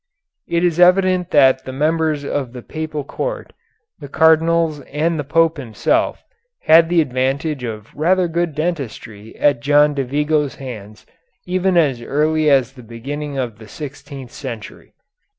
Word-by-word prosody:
It 170 0 0
is 175 -1 +1
evident 180 0 +4
that 130 -2 +4
the 130 - -7
members 155 +1 0
of 135 -4 -3
the 125 -2 -9
Papal 155 -2 -5
court, - - -5 0.5
the 145 - -9
Cardinals 160 0 +3
and 160 +3 0
the - - -1
Pope 165 +3 +2
himself, 115 -6 -1 0.4
had 165 +1 +5
the 175 -1 +4
advantage 135 +1 -2
of 110 -3 -7
rather 180 +4 +2
good 170 -2 -2
dentistry 125 -10 -5
at 145 -1 +2
John 145 +1 +4
de 140 -1 -1
Vigo's 150 +2 0
hands 110 -6 -9 0.4
even 185 0 +1
as 140 -7 +2
early 155 +4 +1
as 135 -3 +3
the 130 - -13
beginning 140 +5 -6
of 120 -5 -4
the 110 - -12
sixteenth 140 -1 -9
century. 115 -6 -9
145 Hz, 150 wpm, -19 LUFS, 130-165 Hz, 0.5 s, had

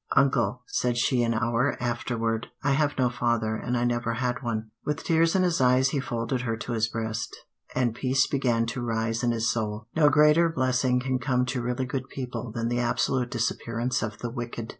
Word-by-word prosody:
"Uncle," 135 -2 +2
said 125 -1 -1
she 120 +1 +2
an 115 -1 +1
hour 115 +4 +1
afterward, 115 -2 -1 0.2
"I 140 - +2
have 145 +1 +1
no 130 -2 +3
father, 120 -2 0
and 125 +2 -2
I 120 - 0
never 120 -1 0
had 125 +1 -1
one." 110 -3 -3
With 150 -1 -2
tears 165 +1 +3
in 185 - +4
his 175 -5 +1
eyes 130 +1 +4
he 140 - -1
folded 120 -1 -2
her 115 -2 -2
to 120 - -6
his 115 -1 +1
breast, 110 0 -4 0.4
and 125 -3 +1
peace 130 +2 +2
began 125 -5 +1
to 120 +2 -4
rise 115 -1 -1
in 120 - +1
his 115 -1 +1
soul. 110 -1 -3
No 155 -2 +5
greater 150 +3 +5
blessing 130 -4 +1
can 130 0 -1
come 125 0 +1
to 130 -1 -2
really 125 +2 -1
good 130 +1 -4
people 125 -3 -5
than 115 +1 -2
the 120 +1 0
absolute 125 +1 0
disappearance 115 +1 -1
of 110 -2 -4
the 120 - -5
wicked. 120 -2 -5
120 Hz, 205 wpm, -27 LUFS, 115-130 Hz, 0.4 s, No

